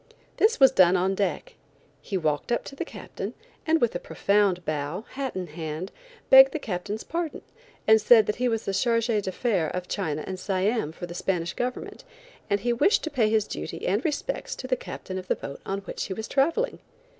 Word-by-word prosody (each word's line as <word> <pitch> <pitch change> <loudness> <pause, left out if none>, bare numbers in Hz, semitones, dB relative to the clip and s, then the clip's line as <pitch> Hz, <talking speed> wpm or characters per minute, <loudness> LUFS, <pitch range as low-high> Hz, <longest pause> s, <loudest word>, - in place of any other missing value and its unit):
This 435 +2 +3
was 265 -2 +8
done 185 -6 +5
on 190 +2 +1
deck. 205 - -2 0.5
He 195 - -3
walked 155 +2 -1
up 235 - +1
to 275 - -9
the - - -3
Captain, - - -7 0.3
and 320 +1 +4
with 240 - +2
a - - -2
profound 200 -3 +1
bow, 155 +7 -3
hat 270 -1 -4
in 185 -1 -3
hand, 160 +2 -6 0.4
begged 265 0 +9
the - - 0
Captain's 210 -3 -4
pardon, 335 -1 -4 0.4
and 220 0 +6
said 220 0 +7
that 210 - -2
he 250 - +1
was 225 -2 -1
chargé 230 +2 +1
d'affaires 190 -3 0
of 180 0 -4
China 155 -7 -2
and 190 -1 -5
Siam 195 -1 0
for 170 - -7
the 175 - -8
Spanish 175 -1 -1
government, 250 +1 -4 0.5
and 200 0 +1
he 240 +3 +1
wished 290 - +3
to 315 - -3
pay 230 -6 +2
his 215 -1 +2
duty - - -6
and 200 +6 +1
respects 330 +11 -2
to - - -8
the - - +1
Captain 190 - -6
of 185 - -10
the - - +1
boat 140 - -8
on 195 +1 -2
which 195 - -5
he 190 - -4
was 220 +2 -5
traveling. 330 - +1
205 Hz, 200 wpm, -26 LUFS, 180-250 Hz, 0.5 s, begged